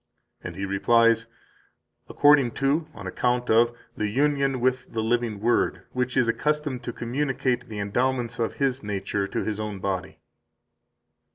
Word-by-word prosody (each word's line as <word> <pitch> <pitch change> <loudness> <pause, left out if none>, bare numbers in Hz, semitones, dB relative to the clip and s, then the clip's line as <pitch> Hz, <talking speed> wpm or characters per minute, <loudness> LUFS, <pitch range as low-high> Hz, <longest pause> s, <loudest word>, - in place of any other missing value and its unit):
And - - -6
he 100 - -3
replies: 115 +3 +3 0.8
"According 145 -5 +5
to 145 +4 0
[On - - -9
account 125 -1 0
of] 115 +1 +5 0.2
the 105 - -1
union 140 +2 +1
with 130 +1 0
the 110 -1 -1
living 115 -2 0
Word, 120 +3 +1
which 125 0 -2
is 125 -2 +4
accustomed 150 +1 -1
to - - -2
communicate 125 0 -1
the 105 - -6
endowments 120 +4 -1
of 115 - -1
His 135 -2 0
nature 100 -1 -2
to - - -2
His 110 -1 -3
own 105 -2 -4
body." 95 -3 -3
120 Hz, 150 wpm, -25 LUFS, 110-130 Hz, 0.8 s, According